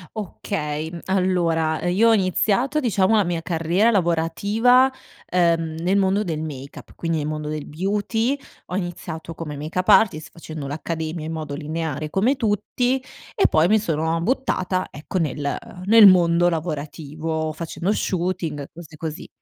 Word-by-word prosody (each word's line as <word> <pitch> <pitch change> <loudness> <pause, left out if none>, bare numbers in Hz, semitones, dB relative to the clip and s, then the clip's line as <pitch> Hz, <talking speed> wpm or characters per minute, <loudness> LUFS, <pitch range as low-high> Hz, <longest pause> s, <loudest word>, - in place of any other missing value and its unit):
Okay, 160 -6 -4
mhmm, 170 - -7
allora 170 -4 +1
io 210 +6 +4
ho - - +6
iniziato, 210 - +1
diciamo 220 -5 +2
a 205 - +4
mia 170 -2 -2
carriera 175 +6 +1
lavorativa, 205 +8 +3 0.4
ehm, 165 -2 +1
nel 180 +4 +1
mondo 195 +1 +2
del 160 -5 -3
make-up, 140 -3 -8
quindi 165 -1 -2
nel 150 - -2
mondo 150 0 -3
del 155 -1 -4
beauty, 210 - -1 0.3
ho 180 - -4
iniziato 170 -3 -5
come 150 -3 -6
make-up 160 +5 -3
artist, 170 -8 +4
facendo 155 -4 -7
l'accademia 160 +2 -4
in 160 - -4
modo 155 -3 -4
lineare 155 -1 -4
come 230 - +2
tutti, 245 +4 0 0.3
e 395 - +4
poi 160 +2 +4
mi 215 +2 +4
sono 165 -3 -1
buttata, 185 -5 0
ecco, 150 +5 -5
nel 145 -3 -1 0.3
nel 225 +1 +8
mondo 175 -2 +6
lavorativo, 160 -1 -3
facendo 170 +4 -3
shooting, 170 -7 -2
cose 165 -2 -12
così. 160 +2 -6
170 Hz, 145 wpm, -22 LUFS, 155-195 Hz, 0.4 s, nel